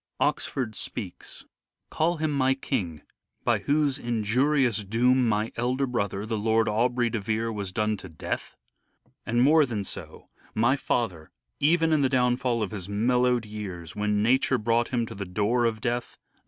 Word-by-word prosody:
Oxford 120 -5 -1
speaks: 100 -3 -6
— - - -66
" - - -58
Call 165 +2 +1
him 155 0 0
my 135 -2 +2
King, 95 - -3 0.4
by - - +2
whose 145 -2 +1
injurious 120 +1 +1
doom 120 +4 +3
My 105 +1 0
elder 125 +3 0
brother, 100 -5 -2
the 110 -1 -2
Lord 110 +1 +2
Aubrey 120 +2 +1
de 115 - -1
Vere, 110 +3 -1
Was 100 -3 -4
done 105 +2 0
to 95 -1 -9
death? 80 - -5 0.7
And 120 +2 +3
more 155 +3 +6
than 115 -7 -2
so, - - -8 0.3
my 120 +5 +3
father, 100 - -2 0.3
Even 165 +2 +3
in 155 - +3
the 135 - +3
downfall 125 -2 +1
of 100 - -4
his 100 -3 -6
mellow'd 125 +3 +2
years, 95 -6 -7
When 105 0 +1
nature 130 +3 +3
brought 115 +1 +1
him 120 -2 0
to - - -8
the 100 - -5
door 105 +6 +1
of 110 -2 -1
death? 120 +1 -2
115 Hz, 170 wpm, -26 LUFS, 105-130 Hz, 0.7 s, more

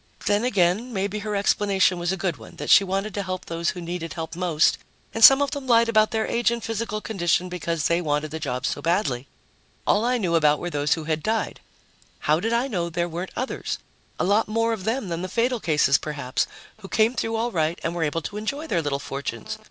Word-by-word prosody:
Then 205 +2 +2
again, 205 +1 +1
maybe 200 0 -2
her 210 0 -3
explanation 200 -2 +2
was 175 +1 -1
a 190 - -2
good 175 -3 -2
one, - - -13
that - - -3
she 200 - +8
wanted 195 +2 -2
to 200 - -2
help 185 -1 -4
those 170 0 -1
who 180 - -4
needed 170 -1 -5
help 165 -1 -5
most 170 -3 +2 0.3
and 225 - 0
some 270 +1 +10
of 280 - -2
them 280 -2 -5
lied 235 -1 +5
about 215 -1 +4
their 220 -1 0
age 235 0 +1
and 235 -1 -3
physical 225 -1 -3
condition 180 -4 0
because 170 -3 -2
they 170 +1 +2
wanted 150 -1 -1
the 160 - -4
jobs 125 -5 -2
so - - -4
badly. 150 -8 0 0.6
All 210 - +3
I 250 +1 +2
knew 180 -7 -1
about 150 -2 +4
were 175 +2 -5
those 145 0 +1
who 160 - -6
had 155 0 -1
died. 220 +4 -1 0.6
How 155 +1 +2
did 225 +5 -1
I 235 +3 +1
know 175 -9 -2
there 170 +1 -1
weren't 175 +2 -5
others 255 - -3 0.4
a - - +1
lot 205 +4 +2
more 230 +2 +1
of 200 -4 -6
them 230 -2 -1
than 170 0 -3
the 185 - -4
fatal 240 +4 +1
cases, 150 -6 +3
perhaps 140 -4 -2 0.3
who 205 -3 -11
came 220 +4 +2
through 225 -1 -2
all 235 +2 -1
right 165 -1 0
and 165 - -1
were 175 - -3
able 160 +1 -1
to 205 - -5
enjoy 280 +9 -3
their 175 - 0
little 145 -2 -1
fortunes? 135 -5 -5
185 Hz, 230 wpm, -24 LUFS, 165-220 Hz, 0.6 s, some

